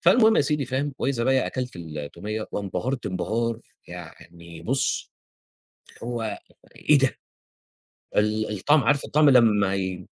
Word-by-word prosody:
فالمهم 220 +5 +5
يا - - +5
سيدي 145 0 +1
فاهم 135 +2 -2
وإذا 125 -3 0
بيَّ 130 0 +2
أكلت 125 -5 -4
التومية 85 +7 -6
وانبهرت 105 +5 -3
انبهار 115 +5 -2 0.3
يعني 85 -1 -11
بُص، 135 +3 -1 0.9
هو 115 -2 -3 0.4
إيه 150 - +4
ده! 135 -1 +2 1.0
ال 105 +1 +1
الطعم 145 +8 +4
عارف 145 -1 +3
الطعم 150 -1 +4
لمّا 105 -6 +4
ي 95 -2 -3
115 Hz, 125 wpm, -25 LUFS, 100-135 Hz, 1.0 s, فالمهم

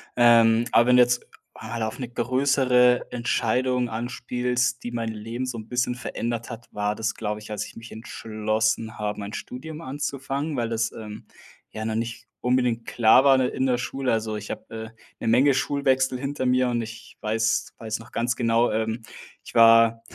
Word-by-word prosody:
Ähm, 115 -1 +5
aber 120 - +5
wenn 125 - +6
jetzt, 125 0 +3 0.3
ah, 115 -1 -4
auf 110 - -5
'ne 125 - -4
größere 125 0 +2
Entscheidung 125 +1 0
anspielst, 125 +2 -2
die 120 - -5
mein 115 -1 -2
Leben 115 +3 -5
so 125 -2 -4
'n 110 -1 -8
bisschen 125 +1 0
verändert 120 -2 -4
hat, 120 0 -9
war 105 0 -1
das, 110 0 -2
glaube 105 -1 -3
ich, 105 - -10
als 105 0 -3
ich - - -14
mich 115 0 -11
entschlossen 110 +1 -2
habe, 105 -1 -3
mein 100 +1 -6
Studium 155 +5 -7
anzufangen, 140 +2 -3
weil 115 -2 -1
das, 115 0 -1
ähm, 105 -1 -9 0.5
ja 110 - -5
noch 110 0 -2
nicht 115 +1 -4 0.2
unbedingt 125 -2 +1
klar 120 +2 +5
war 140 -1 +6
in 130 - +3
der 125 - 0
in 130 - 0
der 125 -1 +2
Schule. 130 +2 -2
Also, 110 -1 -1
ich 105 0 -7
habe, - - -6
äh, 110 0 -6 0.3
'ne - - -4
Menge 130 +5 +5
Schulwechsel 130 -2 +1
hinter 135 0 -3
mir 125 0 +3
und 120 -1 0
ich 115 0 -9
weiß 110 +1 0
weiß 110 -1 -4
noch 115 - -14
ganz 120 +1 -1
genau, 115 0 +2
ähm, 110 +1 -2 0.4
ich - - -12
war 115 0 +6
120 Hz, 190 wpm, -25 LUFS, 110-125 Hz, 0.5 s, wenn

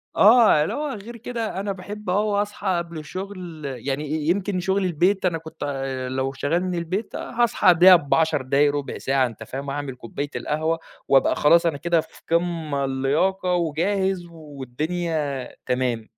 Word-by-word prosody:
آه 215 -8 +6
اللي - - -2
هو 295 0 -2
غير 230 +3 -9
كده 225 -4 -4
أنا 200 0 -2
باحب 200 +1 -7
أوي 205 +2 +2
أصحى 205 -1 -5
قبل 170 -1 -5
الشُغل، 180 +1 -7
يعني 135 +2 -3
ي 155 0 -2
يمكن 185 +1 0
شُغل 190 +2 0
البيت 185 +4 +1
أنا 170 -2 +1
كنت 160 0 -9
آآ، 135 -2 -3
لو 130 +1 -2
شغّال 160 +7 0
من 180 -1 -2
البيت 180 +6 -3
هاصحى 235 -5 0
قبلها 180 +1 +8
ب10 155 -1 +2
دقايق، 140 +2 +2
ربع 145 -1 -4
ساعة 135 -1 +1
أنت 115 -1 -9
فاهم، 135 +5 -6
أعمل 140 -2 -4
كوباية 135 +4 -5
القهوة، 160 +2 -1 0.3
وأبقى 135 -1 +4
خلاص 170 +3 +4
أنا 155 -4 +1
كده 170 +1 +1
في - - -17
قمة 165 -5 0
اللياقة 150 +8 0
وجاهز 180 +3 0
والدنيا 150 -1 -3 0.2
تمام. 125 -3 -1
165 Hz, 165 wpm, -23 LUFS, 140-190 Hz, 0.3 s, قبلها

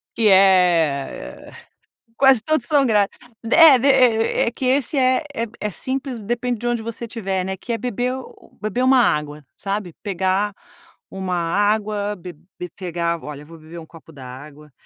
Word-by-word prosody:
Que 225 -2 +2
é 180 -7 +2 0.6
quase 265 -2 +5
todos 310 -6 0
são 285 -3 +3
grátis. 210 -4 +1 0.3
É, 320 -5 +8
de 270 - +1
e 235 -5 +3
e 230 - -1
que 255 - -5
esse 265 +2 +1
é 260 +2 +2 0.4
é 210 -1 -3
simples, 260 - -4
depende 240 +2 -3
de 240 - -4
onde 240 -2 -1
você 230 +1 -5
estiver, 195 -5 -3
né, 190 +1 -4
que 235 - -5
é 230 - -1
beber 245 +2 -2
u 260 - -10 0.2
u - - -27
beber 215 +4 -2
uma 260 0 +5
água, 150 -7 -1
sabe? 195 -3 -4
Pegar 195 +1 -1 0.6
uma 190 -2 -4
água, 205 +4 0
be 180 -2 -10 0.3
be 180 - -6
pegar, 170 -2 -2
olha, 150 -1 -8
vou 165 +1 -13
beber 160 +2 -11
um 160 - -11
copo 165 0 -16
d’água. 145 +3 -12
205 Hz, 170 wpm, -21 LUFS, 175-245 Hz, 0.6 s, É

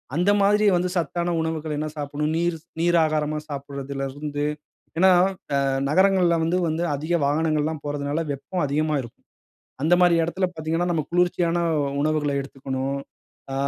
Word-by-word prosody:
அந்த 180 +5 +3
மாரி 210 +2 +4
வந்து 180 +1 0
சத்தான 175 +2 -1
உணவுகள் 160 -1 -3
என்ன 155 +1 -2
சாப்பிடணும். 150 +1 -2
நீர் 170 0 0 0.2
நீர் 175 +1 +3
ஆகாரமா 155 -1 -1
சாப்பிடுறதுல 140 -1 -5
இருந்து. 145 0 -3 0.5
ஏன்னா, 185 +2 +6 0.4
அ - - +3 0.3
நகரங்கள்ல 185 0 +4
வந்து 165 +3 +1
வந்து 160 +2 -1
அதிக 155 +5 -3
வாகனங்கள்லாம் 155 0 0
போறதுனால 145 +2 -2
வெப்பம் 140 +6 -3
அதிகமா 155 +2 0
இருக்கும். 120 -2 -13 0.6
அந்த 170 +3 +5
மாரி 175 -1 +5
இடத்துல 185 +3 -1
பாத்தீங்கன்னா, 165 +2 -1
நம்ம 155 -3 0
குளிர்ச்சியான 175 -1 +2 0.4
உணவுகள 150 -1 +1
எடுத்துக்கணும். 135 0 -4 0.5
அ - - -2
155 Hz, 140 wpm, -24 LUFS, 145-175 Hz, 0.6 s, ஏன்னா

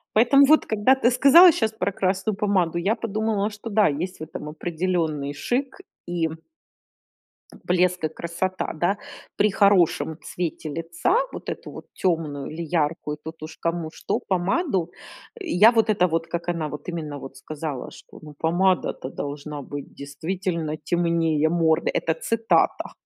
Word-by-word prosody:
Поэтому 275 +5 +6
вот 310 +2 +5
когда 220 +4 +3
ты 265 -2 +2
сказала 280 +8 +8
щас 220 -10 0
про 220 -2 -2
красную 195 +2 -1
помаду, 185 -5 +1
я 195 +6 +1
подумала, 215 -1 -1
что 210 +2 -8
да, 210 0 +4
есть 170 +6 -4
в - - -5
этом 155 -1 -7
определенный 160 -3 -2
шик, 260 - -2 0.3
и 175 -2 -1 1.4
блеск, 180 -1 +2
и - - +2
красота, 170 +4 -3
да. 175 +5 +1 0.4
При 210 - +3
хорошем 190 -5 +3
цвете 170 -2 -4
лица 165 - -1 0.2
вот - - -9
эту - - -5
вот - - -10
тёмную 160 -6 -1
или 160 +2 -5
яркую, 155 -2 -1
тут 160 0 -9
уж 155 +1 -8
кому 170 -1 -2
что, - - -2
помаду, 190 - 0 0.5
я 230 - +5
вот 225 -2 +2
это 190 -4 +3
вот, 165 0 -1
как 170 +1 -5
она 165 -3 -2
вот, 150 +3 -9
именно, 155 -4 -4
вот, 135 -1 -10
сказала, 150 -4 -6
что: - - -14
"Ну 150 -1 -11
помада-то 175 -4 +1
должна 145 +1 -6
быть 145 +1 -8
действительно 160 +2 -3
темнее 165 -1 +1
морды."- 160 -1 +2
Это 165 - +1
цитата. 225 +7 +1
175 Hz, 150 wpm, -24 LUFS, 160-205 Hz, 1.4 s, сказала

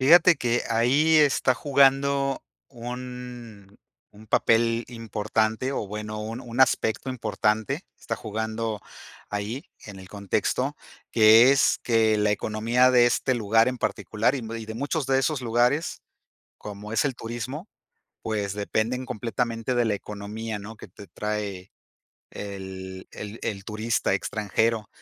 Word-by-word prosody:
Fíjate 170 +6 +7
que, 120 -2 0
ahí 135 +8 +3
está 140 -3 +4
jugando 135 0 +2 0.3
un 120 -4 -8 0.3
un 105 +1 -16
papel 115 +2 +3
importante, 110 +1 -1
o 105 - -2
bueno, 105 +1 -5
un 115 +3 -5
un 120 0 -4
aspecto 130 -1 +2
importante, 110 -3 -1 0.2
está - - -3
jugando 110 0 -3 0.5
ahí 105 - -4 0.2
en 100 -2 -9
el 95 - -12
contexto, 100 -1 -1 0.3
que 110 +3 +7
es 140 -1 +3
que 110 -2 +3
la 105 0 +2
economía 115 +5 +2
de 120 -1 +6
este 130 +1 +1
lugar 115 0 +3
en 130 - -3
particular 115 +5 0
y - - -2
y 115 -2 -6
de 110 - -6
muchos 140 +2 -2
de 135 0 +3
esos 145 +1 0
lugares, 125 +6 +1 0.6
como 105 +1 -8
es 115 - +2
el 135 - 0
turismo, 120 - -6 0.5
pues, 105 -3 -2
dependen 110 +5 -1
completamente 115 +1 -2
de 120 -1 +2
la 105 - +1
economía, 105 +2 -6
¿no?, 105 +3 -9
que - - -11
te 100 - -13
trae 100 0 -4 0.6
el 95 -2 -7
el 105 +2 -8
el 100 -4 -3
turista 110 -1 0
extranjero. 110 +2 0
115 Hz, 135 wpm, -25 LUFS, 105-125 Hz, 0.6 s, Fíjate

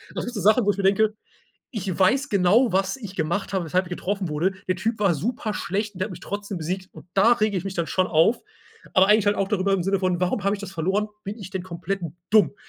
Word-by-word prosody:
Das - - -2
sind 245 - -5
so 215 - -3
Sachen, 215 +4 +4
wo 205 - +4
ich - - -7
mir 200 - -2
denke: 210 +2 +3 0.6
„Ich 195 -7 -4
weiß 260 +10 +3
genau, 200 +4 +4
was 195 +4 +1
ich 210 -7 -9
gemacht 175 +6 -1
habe, 190 -3 0
weshalb 180 +3 +1
ich - - -11
getroffen 190 +1 -2
wurde. 160 +5 0 0.2
Der 185 - +1
Typ 220 +5 -1
war 195 -4 +3
super 220 - -3
schlecht 205 +3 -2
und 180 - -11
der 185 - +1
hat 215 - -10
mich - - -9
trotzdem 205 -2 -5
besiegt 185 +3 -4
und - - -13
da 205 +5 +5
rege 215 -3 0
ich 180 - -7
mich 195 -1 -4
dann 170 -2 -1
schon 185 -1 +1
auf, 170 +8 +3 0.6
aber 190 +1 +5
eigentlich 210 -1 +4
halt 205 - +3
auch 195 0 0
darüber 195 -1 +1
im 185 - 0
Sinne 195 +2 +1
von: 185 -2 0
„Warum 185 +2 0
habe 200 +1 +2
ich 200 - -12
das 195 -1 -7
verloren? 195 +5 0 0.2
Bin 205 +3 -5
ich 195 -3 -8
denn 190 -2 -4
komplett 185 +2 -4 0.3
dumm?“ 215 -1 +4
195 Hz, 265 wpm, -24 LUFS, 185-210 Hz, 0.6 s, da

